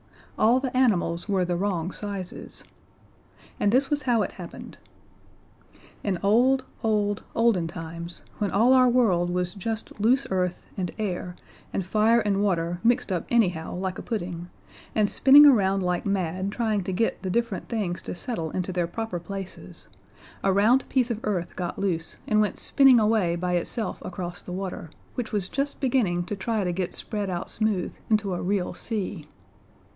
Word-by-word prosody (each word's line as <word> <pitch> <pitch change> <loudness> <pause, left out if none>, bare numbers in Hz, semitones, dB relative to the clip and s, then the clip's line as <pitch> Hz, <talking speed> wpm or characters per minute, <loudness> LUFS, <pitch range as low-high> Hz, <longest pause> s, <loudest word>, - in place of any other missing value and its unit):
All 235 +4 +5
the 260 -1 -4
animals 195 -8 +1
were 190 -2 +2
the 175 0 -1
wrong 180 -2 -1
sizes! 200 -3 -6 1.0
And 205 - +2
this 270 +4 +2
was 290 0 +1
how 240 -4 +2
it - - -4
happened. 175 -2 -10 1.2
In 195 -3 0
old, 255 +6 +4 0.2
old, 210 -2 +1
olden 225 -8 +3
times, 170 +1 -7 0.2
when 205 - 0
all 230 +7 +4
our 255 -1 +6
world 195 -8 +3
was 180 0 -1
just 215 +2 -5
loose 255 +5 +3
earth 180 -1 -1
and 180 -2 -2
air 180 -4 -3 0.4
and 190 - -2
fire 215 +4 +3
and 200 -2 +1
water 175 -3 0
mixed 240 -2 +2
up 180 -3 -2
anyhow 180 -10 +1
like 185 0 -3
a - - -5
pudding, 175 -6 -4 0.5
and 215 -1 +3
spinning 275 +7 +7
around 195 -8 +4
like 180 +2 -1
mad 190 0 -1
trying 215 -3 0
to 190 - -2
get 225 +5 0
the 190 - -3
different 230 0 -1
things 200 -7 -2
to - - -6
settle 175 -5 -3
into 185 +3 -3
their 175 -1 0
proper 205 0 -4
places, 195 +2 -8 0.6
a 195 - +3
round 220 +7 +3
piece 250 -2 +1
of 220 - -2
earth 185 -5 -2
got 175 -2 -4
loose 175 -4 -2
and 215 0 +3
went 210 - 0
spinning 270 -4 +6
away 210 -6 +2
by 180 +1 -2
itself 180 +6 -2
across 175 -1 -5
the - - -9
water, 185 -3 -5 0.2
which 240 -3 -4
was 200 -3 -1
just 280 +5 -2
beginning 235 -10 +1
to 205 - -4
try 210 +2 -1
to 180 - 0
get 180 0 -3
spread 205 -3 -3
out 175 -1 -4
smooth 210 -5 -1 0.2
into 210 -3 +1
a 175 - -3
real 190 0 -1
sea. 200 -7 -4
200 Hz, 170 wpm, -26 LUFS, 180-225 Hz, 1.2 s, spinning